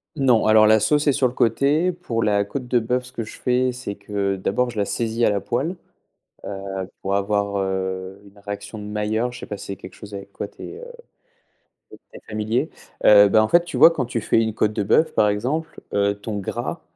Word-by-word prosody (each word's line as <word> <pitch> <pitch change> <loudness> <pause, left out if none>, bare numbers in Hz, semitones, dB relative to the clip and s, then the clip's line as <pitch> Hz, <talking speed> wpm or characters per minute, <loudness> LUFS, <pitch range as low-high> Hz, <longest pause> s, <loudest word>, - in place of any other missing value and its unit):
Non 125 -6 +3
alors 110 0 +6
la 110 +1 +5
sauce 150 +7 +2
est - - +6
sur 130 -1 +2
le 120 - -6
côté. 140 +10 +2
Pour 125 -11 -3
la 100 -1 +2
côte 125 +4 -6
de 125 -1 +3
bœuf, 125 +2 -1
ce 125 - -12
que 120 - -4
je 110 - -10
fais 125 0 +1
c'est 125 -5 -6
que 100 -1 -2
d'abord 100 +6 0
je 115 - -11
la 100 - +1
saisis 115 +2 -2
à - - +4
la 100 -1 0
poêle, 150 +10 -2 0.7
heu, 95 -1 -5
pour 95 - -2
avoir, 100 0 0
heu, 95 0 -3
une 100 +1 -18
réaction 100 +1 -7
de 105 - -8
Mailleur, 105 +3 -1
je 125 - -10
sais - - -7
pas 105 - -6
si - - -9
c'est 100 - -4
quelque 95 - -12
chose 105 -2 -10
avec 100 0 -9
quoi - - -5
tu - - -13
es 435 - -8 1.1
tu - - -12 0.2
es - - -10
très - - -19
familier? 110 +7 -1 0.4
Heu, 105 -1 +8
bah 110 +2 +4
en 110 - +1
fait 170 +5 +4
tu 175 - -5
vois - - +9
quand 155 -6 -2
tu 120 -1 -3
fais 115 +1 +2
une 110 -1 -1
côte 105 0 0
de 105 - 0
bœuf 155 +10 +2
par 105 - +4
exemple, 135 +11 -3
heu, 100 0 +2
ton 105 0 -4
gras 100 - -4
110 Hz, 235 wpm, -22 LUFS, 100-125 Hz, 1.1 s, vois